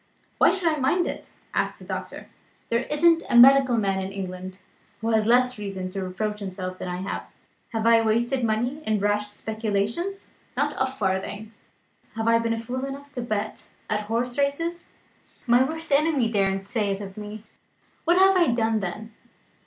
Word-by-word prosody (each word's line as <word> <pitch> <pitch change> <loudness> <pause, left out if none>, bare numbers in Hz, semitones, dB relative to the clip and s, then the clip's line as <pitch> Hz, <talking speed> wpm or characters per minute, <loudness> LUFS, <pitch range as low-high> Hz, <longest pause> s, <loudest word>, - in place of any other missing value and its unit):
"Why - - +7
should 375 -3 0
I 310 -1 +2
mind 320 +7 +2
it?" - - -6 0.2
asked - - -1
the - - -13
doctor. - - -6 0.4
"There 235 +2 +1
isn't 330 +2 +3
a 240 - +4
medical 260 0 +7
man 195 -3 +1
in 190 0 -4
England 185 -1 -7 0.4
who 225 +2 -1
has 220 -1 +2
less 250 0 +3
reason 190 -2 -5
to 195 0 -3
reproach 210 +3 -3
himself 185 -2 -5
than - - -5
I 180 0 -4
have. - - -4 0.4
Have 225 -2 -2
I 230 0 +6
wasted 235 +4 +1
money 240 +6 0
in 215 -5 0
rash 205 +1 +1
speculations? 220 - -3 0.2
Not - - +1
a 260 - +2
farthing. 205 -1 -2 0.6
Have 225 0 -2
I 230 0 +5
been 230 0 0
fool 245 +3 -4
enough 280 +1 -6
to 260 -4 -4
bet 215 -2 -4 0.2
at 210 0 -1
horse 240 +4 -1
races? 330 +5 -1 0.6
My 240 0 +5
worst 320 +3 -5
enemy 280 -5 +3
daren't 195 -2 0
say 210 -2 0
it 195 0 -1
of 195 -2 -8
me. 210 0 -8 0.6
What 345 +2 +3
have 385 0 +6
I 340 -10 +3
done 225 -1 +1
then? 215 +4 -5
225 Hz, 175 wpm, -25 LUFS, 205-265 Hz, 0.6 s, Why